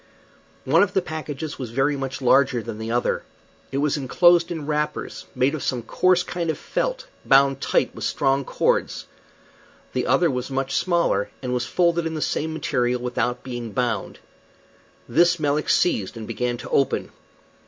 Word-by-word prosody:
One 160 +6 +4
of 200 - +2
the 190 - +2
packages 155 -2 -5
was 125 -3 -4
very 135 +5 +1
much 135 -1 -5
larger 130 -2 +3
than 110 -1 -6
the 110 0 -5
other. 120 +1 0 0.5
It 135 - -2
was 145 +1 +1
enclosed 170 +5 +4
in 160 -4 -4
wrappers 150 0 -3
made 130 +3 +2
of 155 - -3
some 125 -2 -2
coarse 180 +9 +2
kind 170 -2 -3
of 160 - -1
felt, - - -2 0.2
bound 135 0 +4
tight - - +1
with - - -8
strong 135 0 +1
cords. 485 - 0 0.9
The - - -1
other 170 -4 +3
was 125 0 -3
much 135 0 -2
smaller, 170 - +1
and, 125 -1 -2
was 125 -1 -1
folded 170 -2 +1
in 160 - -4
the - - -3
same 155 +1 -1
material 125 -5 0
without 125 0 -2
being 120 -4 -6
bound. 125 -1 -2 0.9
This 170 +6 +3
Melick 150 0 0
seized 110 - +1
and 110 - -6
began 125 -1 -2
to - - -9
open. 135 - +1
140 Hz, 170 wpm, -23 LUFS, 125-160 Hz, 0.9 s, One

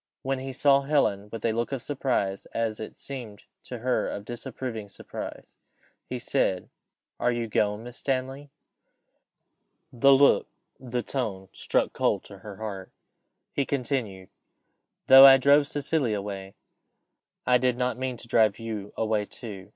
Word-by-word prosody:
When 135 0 -1
he 135 +1 -5
saw 140 +1 +4
Helen 110 -9 +1
with 115 -1 -6
a 115 - +3
look 115 +3 -2
of 135 - -2
surprise 120 -8 -2
as 115 -2 -1
it 110 - -8
seemed 120 -7 -7 0.2
to 125 - -6
her, 125 +2 0
of 100 - -6
disapproving 120 -3 -6
surprise - - -9 0.5
he 125 - -3
said, 115 -7 -1 0.5
"Are 120 - +2
you 120 -1 -2
gone, 105 0 0
Miss 120 0 -9
Stanley?" 135 +1 -3 1.4
The 135 +3 +5
look, 140 +1 +5 0.3
the 125 -2 -3
tone, 100 -8 -4
struck - - 0
cold - - 0
to 100 - -13
her 100 +1 -9
heart. 100 -3 -7 0.6
He 140 - +1
continued 125 -9 -3 0.8
"Though 135 +1 +10
I 135 0 +9
drove 140 +2 +4
Cecilia 140 -6 0
away, 100 -1 -6 0.9
I 125 -1 +4
did 125 -1 +1
not 125 0 -1
mean 130 -1 -3
to 115 - -10
drive 110 -3 +3
you 110 -3 -6
away 110 -2 0
too. 100 -4 -9
120 Hz, 150 wpm, -26 LUFS, 105-135 Hz, 1.4 s, Though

